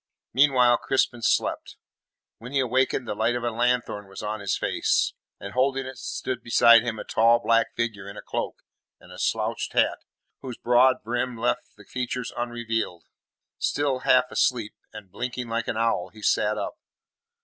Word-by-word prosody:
Meanwhile 125 -2 +5
Crispin 130 -3 0
slept. - - 0 0.6
When 125 +3 -9
he 140 - +2
awakened 130 0 +1
the - - -2
light 110 +3 0
of 120 - -3
a 120 - 0
lanthorn 120 -3 0
was 95 - -9
on 105 +1 -3
his 100 -1 -1
face, - - +1 0.3
and 100 0 -8
holding 135 +1 +1
it 130 0 -8
stood 130 - -4
beside 115 0 +6
him 115 -1 -3
a - - -5
tall 115 +1 +4
black 115 -1 +1
figure 110 -4 -3
in 100 - -10
a - - -8
cloak - - -4 0.4
and - - -17
a - - -10
slouched - - -1
hat - - +2 0.4
whose 125 -3 -7
broad 125 +2 +3
brim 120 +2 -2
left 120 +2 -2
the 105 - -15
features 125 0 -4
unrevealed. 115 -7 -3 0.6
Still 140 -3 0
half 125 0 +3
asleep, 115 -4 0 0.2
and 105 -3 -11
blinking 125 +3 -4
like 115 +1 -2
an - - -2
owl, 115 -6 0
he 110 -1 -15
sat 105 +1 +2
up. - - -5
120 Hz, 170 wpm, -25 LUFS, 110-125 Hz, 0.6 s, beside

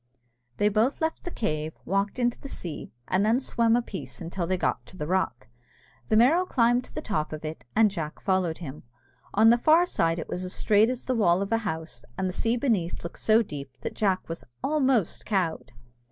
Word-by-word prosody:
They 205 - +3
both 220 +6 +2
left 320 0 -2
the - - -2
cave, 155 - -3
walked 195 +3 0
into 240 -1 0
the 275 - -7
sea, 170 - -6 0.2
and 185 +2 +2
then 225 +4 +3
swam 235 -3 +2
a 240 - +1
piece 195 -5 -7
until 170 0 -4
they 185 +1 +1
got - - -1
to 185 - -12
the 150 - -3
rock. 150 - -1 0.6
The 215 - +3
Merrow 290 +11 +5
climbed 245 -7 +2
to - - -15
the - - -4
top 170 -8 -2
of 155 0 -6
it, 155 -3 -6
and 215 -1 +5
Jack 160 -5 -5
followed 185 -4 0
him. 150 -4 -8 0.5
On 220 +2 +7
the 240 - +4
far 320 +7 +5
side 165 - 0
it 165 - -5
was 180 - -4
as 185 - -4
straight 215 +2 +3
as 255 -1 -4
the 260 - 0
wall 195 -5 +3
of 200 - -6
a 225 - +3
house, 160 - -4
and 190 - 0
the 180 - -3
sea 230 +5 0
beneath 220 -10 0
looked 170 - -7
so 220 +1 +4
deep 140 -8 -8
that - - -4
Jack 195 -3 0
was 165 0 -6 0.2
almost 265 - +1
cowed. 185 -6 -1
200 Hz, 215 wpm, -27 LUFS, 170-235 Hz, 0.6 s, On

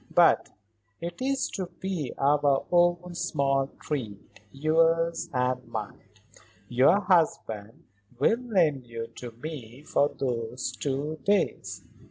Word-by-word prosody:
But - - +5 0.5
it 170 +6 -6
is 270 +1 +1
to 185 -3 -3
be 180 -8 -3
our 140 -1 +3
own 175 0 +3
small 140 -6 +1
treat; 115 -10 -5
yours 165 +3 +2
and 125 -1 0
mine. 110 -3 -6 0.6
Your 135 - +4
husband 155 - 0 0.3
will 230 - +3
lend 170 - +1
you 115 0 -6
to 125 - -6
me 125 0 -8
for 145 -2 +2
those 125 -1 -3
two 145 +3 -3
days." 205 0 0
145 Hz, 115 wpm, -27 LUFS, 125-175 Hz, 0.6 s, But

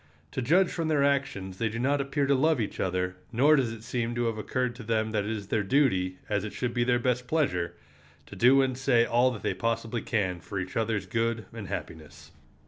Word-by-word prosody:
To 130 - -3
judge 175 +9 +3
from 165 -2 -2
their 150 -3 +2
actions 130 -10 -1
they 115 - +1
do 110 - -5
not 140 +4 +1
appear 140 +1 0
to 140 - +3
love 150 +2 +3
each 110 - -3
other, 90 0 -1
nor 140 +6 +5
does 130 -5 +1
it 110 -1 -9
seem 120 0 -2
to 120 0 0
have 115 -2 -1
occurred 125 +2 -1
to 125 - -8
them 110 0 0
that 105 -2 0
it - - -3
is 105 -3 -4
their 110 - +1
duty, 95 -6 +1
as 105 -2 0
it 105 - -5
should 125 -2 -2
be 120 0 +1
their 120 0 +2
best 125 0 -1
pleasure, 105 - 0 0.5
to - - -11
do 135 +3 +5
and 130 -1 -2
say 125 -3 +3
all 120 +2 +3
that 110 -6 -6
they - - 0
possibly 115 +3 -2
can 95 -6 -1
for 95 +4 -5
each 95 0 -5
other's 110 -3 0
good 115 +2 -1
and 110 -4 -7
happiness. 80 -3 -8
115 Hz, 230 wpm, -28 LUFS, 105-130 Hz, 0.5 s, nor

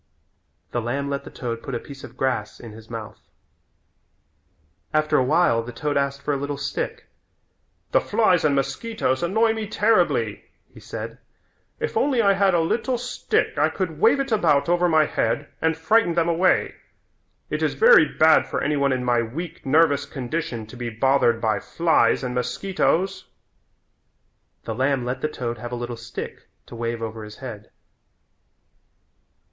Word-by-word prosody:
The 120 - -1
lamb 140 +5 -2
let 140 - -3
the - - -8
toad 115 -2 -5
put 135 - -5
a - - -2
piece 140 +1 -12
of - - -11
grass 125 -5 -2
in 115 - -10
his 110 +1 -13
mouth. 115 -2 -7 1.8
After 155 0 +2
a 130 - +4
while 130 -4 +3
the 120 +2 -8
toad 145 +5 -3
asked 140 0 -1
for 150 - 0
a - - 0
little 140 +1 -4
stick. - - -4 0.9
"The - - +4
flies 190 -6 +2
and 145 -2 +3
mosquitoes 135 - -1
annoy 220 +6 +2
me 220 -1 -4
terribly," 215 +2 +1 0.3
he - - -13
said. - - -7 0.6
"If 460 0 -3
only 270 -4 +2
I 200 -3 +5
had 195 -2 +3
a 170 - +3
little 240 +9 0
stick 250 +1 -1
I - - +4
could - - -4
wave 435 -10 +4
it 270 -2 -2
about 165 -10 +3
over 175 +1 +2
my 160 -1 +4
head 145 0 -1
and 160 0 +1
frighten 170 +2 +2
them 170 -1 +2
away. 170 +2 +2 0.8
It - - -2
is - - 0
very 480 +1 +7
bad 160 0 +4
for - - -2
any 150 +1 +1
one 140 -1 +2
in 130 -1 -1
my 120 -1 +2
weak, 155 +7 -6
nervous 145 -1 +3
condition 130 -4 -4
to 110 - -13
be 120 -1 -4
bothered 120 0 +2
by 110 -3 0
flies 165 +3 +2
and 125 -1 -3
mosquitoes." 190 +7 -1 1.4
The 115 - -4
lamb 130 +1 0
let 125 +2 -3
the 155 - 0
toad 120 -5 -4
have 120 +2 -7
a - - -2
little 120 0 -5
stick 115 +1 -8 0.2
to - - -11
wave 115 0 -3
over 110 0 -5
his 105 0 -10
head. 115 -6 -9
140 Hz, 170 wpm, -23 LUFS, 120-175 Hz, 1.8 s, very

